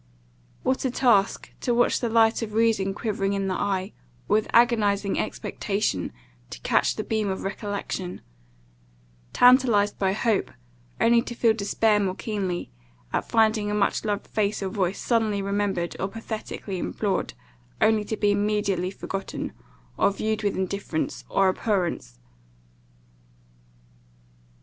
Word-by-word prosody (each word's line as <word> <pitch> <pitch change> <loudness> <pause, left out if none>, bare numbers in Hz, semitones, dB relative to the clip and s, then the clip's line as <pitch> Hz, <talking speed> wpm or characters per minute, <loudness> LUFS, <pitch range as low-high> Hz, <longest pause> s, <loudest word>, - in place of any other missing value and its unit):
What 260 +1 0
a 260 - +1
task, 235 -6 +2
to 240 - +1
watch 240 - +3
the 235 - -1
light 225 0 +4
of 215 -2 -4
reason 215 -4 +2
quivering 200 -3 -1
in 195 -1 -1
the 190 - 0
eye, 190 0 -1 0.3
or - - +1
with 215 - -1
agonizing 210 -4 +3
expectation 195 - -2 0.4
to - - -8
catch - - +2
the 215 - -3
beam 215 -1 -1
of 190 - -3
recollection; 195 -2 -4 1.1
tantalized 245 -5 +4
by 190 -1 +2
hope, 215 0 +1 0.5
only 235 0 +5
to 240 - -7
feel 230 -2 +3
despair 210 0 +2
more 190 -2 -1
keenly, 195 - -3 0.4
at - - -1
finding 220 -2 +3
a 210 - -1
much 205 -1 +1
loved 205 -2 -2
face 210 -1 -1
or 190 - -1
voice, 190 -1 -1
suddenly 220 -4 +1
remembered, 200 -3 -1
or 190 - 0
pathetically 215 -2 -6
implored, 195 - -2 0.4
only 220 -1 +3
to 220 - -3
be 205 -1 +2
immediately 205 -3 0
forgotten, 195 0 -5 0.4
or - - +4
viewed 215 +2 -2
with 205 -2 -1
indifference 190 -3 -3
or 195 - +3
abhorrence! 180 - -1
205 Hz, 135 wpm, -25 LUFS, 195-220 Hz, 1.1 s, only